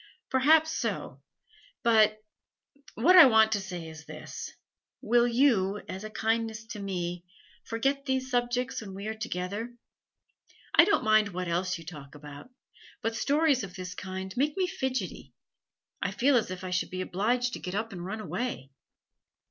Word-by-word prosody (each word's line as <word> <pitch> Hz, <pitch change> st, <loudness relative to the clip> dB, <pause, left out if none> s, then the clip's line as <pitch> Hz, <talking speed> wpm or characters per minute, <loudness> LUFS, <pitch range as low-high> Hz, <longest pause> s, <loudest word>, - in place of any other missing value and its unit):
'Perhaps 310 Hz, +5 st, +4 dB
so, -, -, -3 dB, 0.6 s
but 220 Hz, -2 st, +5 dB, 0.8 s
What 320 Hz, -, +5 dB
I 350 Hz, -6 st, +11 dB
want 220 Hz, -2 st, +5 dB
to 205 Hz, -2 st, +1 dB
say 180 Hz, -4 st, -6 dB
is 160 Hz, 0 st, -11 dB
this. -, -, -8 dB, 0.5 s
Will 240 Hz, +2 st, +3 dB
you, 230 Hz, -6 st, +2 dB
as 190 Hz, +2 st, -6 dB
a 215 Hz, -, -6 dB
kindness 225 Hz, 0 st, -1 dB
to 215 Hz, -, -6 dB
me, 180 Hz, -3 st, -3 dB, 0.4 s
forget 275 Hz, +5 st, -1 dB
these 265 Hz, -1 st, -1 dB
subjects 245 Hz, +1 st, 0 dB
when 195 Hz, -3 st, -8 dB
we 200 Hz, +1 st, -7 dB
are 220 Hz, -, -2 dB
together? 220 Hz, +2 st, -4 dB, 1.0 s
I 335 Hz, -, +8 dB
don't 405 Hz, -, +2 dB
mind 215 Hz, -1 st, +4 dB
what 180 Hz, -1 st, -4 dB
else 180 Hz, +2 st, -1 dB
you 165 Hz, -, -12 dB
talk 150 Hz, -4 st, -10 dB
about, 145 Hz, -, -11 dB, 0.5 s
but 225 Hz, 0 st, -1 dB
stories 285 Hz, +1 st, +2 dB
of 190 Hz, -2 st, -8 dB
this 185 Hz, -1 st, -6 dB
kind 190 Hz, 0 st, -6 dB
make 290 Hz, +5 st, 0 dB
me 375 Hz, -, +2 dB
fidgety; 265 Hz, -7 st, -4 dB, 0.7 s
I 195 Hz, -, 0 dB
feel 255 Hz, +8 st, +2 dB
as 230 Hz, -5 st, +2 dB
if 185 Hz, 0 st, -6 dB
I 185 Hz, -, -5 dB
should 180 Hz, -, 0 dB
be 185 Hz, 0 st, -4 dB
obliged 240 Hz, +7 st, 0 dB
to -, -, -4 dB
get 180 Hz, 0 st, -5 dB
up 220 Hz, +2 st, -2 dB
and 175 Hz, -3 st, -7 dB
run 215 Hz, +4 st, -5 dB
away.' 225 Hz, -, -4 dB
220 Hz, 165 wpm, -28 LUFS, 185-245 Hz, 1.0 s, I